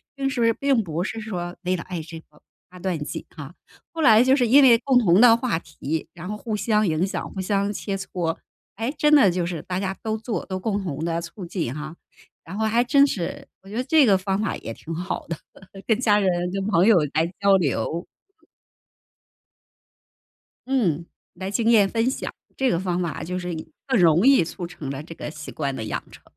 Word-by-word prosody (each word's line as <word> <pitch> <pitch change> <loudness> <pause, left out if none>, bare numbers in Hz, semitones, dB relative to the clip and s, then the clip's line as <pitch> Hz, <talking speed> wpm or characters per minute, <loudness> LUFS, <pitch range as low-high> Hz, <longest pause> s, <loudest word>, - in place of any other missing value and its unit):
并 275 0 -1
是 240 -4 +2
并 275 -3 +1
不 170 -1 -3
是 225 +2 -4
说 180 -5 -5
为 185 -1 0
了 170 - -5
爱 180 -3 -5
这 165 +1 -9
个 150 -1 -26 0.3
八 180 - -12
段 180 -1 -2
锦 - - -5
啊。 145 +2 -9 0.4
后 325 -1 -4
来 225 -3 +7
就 260 +1 +4
是 250 -4 +2
因 275 +5 +7
为 235 -3 +7
共 260 0 +2
同 200 -5 +5
的 230 -2 +7
话 235 -9 -1
题， 155 0 -5
然 175 +1 -8
后 210 - -3
互 215 +1 -4
相 215 -1 +1
影 160 +2 +1
响， 195 - -4
互 195 - -7
相 200 +1 0
切 200 -1 -4
磋。 180 -4 -3 0.4
哎， 225 +4 -1
真 300 +1 +3
的 210 -9 +6
就 175 -1 -1
是 170 -3 -4
大 180 +3 -3
家 195 0 -2
都 220 -1 -2
做 225 0 -4
都 185 -1 -3
共 200 0 -2
同 160 -3 -4
地 170 0 -1
促 175 +2 -8
进 170 -8 -3
啊， 150 +3 -7 0.5
然 185 +4 -8
后 220 - 0
还 230 +2 +3
真 275 +3 +5
是 190 -11 -4
我 195 - -15
觉 210 - -8
得 250 - 0
这 285 0 +4
个 195 -3 +5
方 195 +1 -1
法 210 - -1
也 115 - -7
挺 165 - -8
好 180 +3 -4
的， 165 -1 -4 0.5
跟 220 -1 +2
家 215 -5 +4
人、 195 -2 +2 0.2
跟 195 0 -2
朋 190 -1 +3
友 220 - +7 0.2
来 160 +2 +2
交 200 -1 +5
流。 165 +1 -1 2.6
嗯， 180 - 0 0.3
来 190 +2 -5
经 225 +2 0
验 210 -4 +5
分 230 +4 +1
享。 - - -4 0.2
这 265 -1 +1
个 170 - +1
方 180 -1 -1
法 170 -3 -3
就 180 +2 -3
是 180 -1 -4 0.3
更 260 -5 +2
容 170 +5 +5
易 275 -6 +6
促 175 +2 -5
成 155 -5 -7
了 140 +1 -5
这 165 +2 -10
个 150 - -6
习 150 -1 -9
惯 140 -3 -2
的 110 - -5
养 105 - -3
成， - - -15
190 Hz, 230 characters per minute, -23 LUFS, 170-225 Hz, 2.6 s, 来